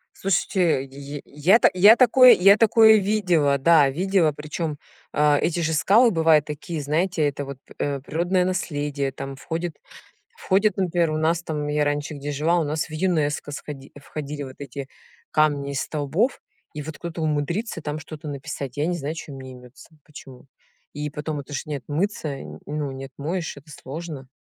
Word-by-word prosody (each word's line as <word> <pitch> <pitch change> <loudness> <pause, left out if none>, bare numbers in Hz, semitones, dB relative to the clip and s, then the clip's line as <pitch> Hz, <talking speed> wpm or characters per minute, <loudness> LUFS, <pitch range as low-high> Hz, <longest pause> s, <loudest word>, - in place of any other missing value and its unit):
Слушайте, 180 -5 +1
й 140 +1 -8
я 165 +10 +3
та - - +5
я 205 +5 +8
такое 255 0 +7
я 195 +3 +6
такое 220 -1 +6
видела, 180 -9 +2
да, 150 0 +5
видела. 180 0 +1
Причём, 150 +1 -4 0.4
а, 150 -1 +3
эти 175 0 0
же 160 -1 0
скалы 220 +10 +5
бывают 160 -4 +4
такие, 150 +1 -5
знаете, 160 +3 0
это 145 0 -3
вот 140 -1 -8
п - - -16
э, 140 -1 -2
природное 175 +6 0
наследие, 145 -6 -2
там 135 +1 -7
входит 165 +3 -4 0.6
входит, 200 +1 +1
например, 175 -4 +1
у - - -1
нас 160 +2 +1
там, 150 -3 -3
я 150 0 +1
раньше, 145 +1 -2
где 145 0 -5
жила, 160 +5 +1
у 165 - +1
нас 155 +2 -2
в - - -11
ЮНЕСКО 155 -4 -1
сходи 140 -1 -8
входили 145 0 -6
вот 130 -1 -9
эти 140 -1 -7 0.4
камни 145 -2 +1
из 140 -1 -2
столбов. 155 - -1 0.3
И 150 - -5
вот 160 +2 -8
кто-то 170 -1 -6
умудрится 160 +7 -2
там 150 0 -4
что-то 155 -1 -9
написать, 140 -1 -6
я 145 +2 0
не 175 0 -1
знаю, 150 +1 -4
чё 160 -2 -8
им 135 - -9
неймётся, 130 0 -12 0.2
почему. 135 -3 -13 0.5
И 150 0 -4
потом 150 0 -4
это 145 +1 -9
ж 135 - -2
не 150 -1 -3
отмыться, 150 - -3 0.3
ну, 150 -1 -3
не 135 0 -7
отмоешь, 155 +5 -4
это 145 +2 -15
сложно. 145 -1 -8
150 Hz, 175 wpm, -23 LUFS, 145-175 Hz, 0.6 s, я